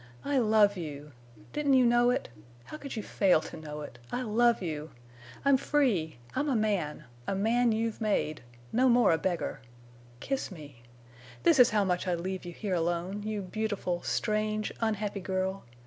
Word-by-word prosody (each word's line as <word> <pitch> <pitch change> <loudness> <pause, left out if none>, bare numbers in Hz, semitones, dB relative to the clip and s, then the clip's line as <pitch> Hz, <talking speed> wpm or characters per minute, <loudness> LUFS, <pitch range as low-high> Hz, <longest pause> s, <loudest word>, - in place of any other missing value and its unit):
I 285 -2 +2
love 215 -3 +4
you! 150 -3 -7 0.4
Didn't 285 -2 +2
you 255 -1 +5
know 240 +1 +4
it? 250 - 0 0.4
How 305 - -9
could 280 -4 -7
you 215 - -3
fail 190 -5 +3
to - - -8
know 150 -1 -7
it? 120 -4 -9
I 250 - -1
love 235 +1 +3
you! 155 -4 -4 0.6
I'm 280 -1 +6
free! 225 - +1 0.2
I'm 295 +2 0
a 265 - +1
man—a 150 - -2
man 230 +4 +2
you've 225 +1 -1
made—no 155 - 0
more 240 -4 +5
a 160 - +2
beggar!... 180 -3 -2 0.6
Kiss 270 - -2
me! 145 - -11 0.6
This 330 -5 +5
is 250 0 +8
how 210 -2 +2
much 180 -1 -1
I'd 175 -2 0
leave 185 +1 -4
you 175 - -5
here 195 +2 -4
alone—you 185 +5 -1
beautiful, 190 -3 -2
strange, 215 0 -1
unhappy 210 -2 -1
girl. 190 +1 -2
205 Hz, 165 wpm, -30 LUFS, 170-235 Hz, 0.6 s, is